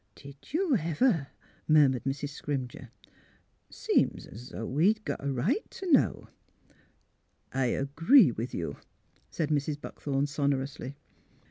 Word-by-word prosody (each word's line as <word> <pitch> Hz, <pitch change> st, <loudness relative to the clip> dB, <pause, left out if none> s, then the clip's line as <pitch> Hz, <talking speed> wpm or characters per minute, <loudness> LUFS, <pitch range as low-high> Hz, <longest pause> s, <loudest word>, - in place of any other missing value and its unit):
Did 140 Hz, 0 st, -14 dB
you 325 Hz, -2 st, +2 dB
ever! 165 Hz, -, +1 dB, 0.2 s
" -, -, -31 dB
murmured 145 Hz, -5 st, +4 dB
Mrs. 135 Hz, +1 st, -2 dB
Scrimger. 135 Hz, -3 st, -5 dB, 0.4 s
*' -, -, -35 dB, 0.2 s
Seem's 120 Hz, +5 st, -1 dB
'o' 115 Hz, -, -5 dB
we'd 195 Hz, -, +2 dB
got -, -, -4 dB
a 140 Hz, -, -1 dB
right 170 Hz, -, 0 dB
t' 385 Hz, -, -8 dB
know." 330 Hz, -6 st, +3 dB, 0.7 s
'' -, -, -41 dB, 0.5 s
I 130 Hz, -1 st, +1 dB
agree 145 Hz, -, +4 dB
with 115 Hz, +2 st, -4 dB
you," 85 Hz, -, -4 dB, 0.5 s
said 155 Hz, -2 st, -2 dB
Mrs. 145 Hz, 0 st, 0 dB
Buckthorn, 140 Hz, -1 st, -2 dB
sonorously. 140 Hz, -2 st, -2 dB
145 Hz, 130 wpm, -29 LUFS, 135-165 Hz, 0.7 s, murmured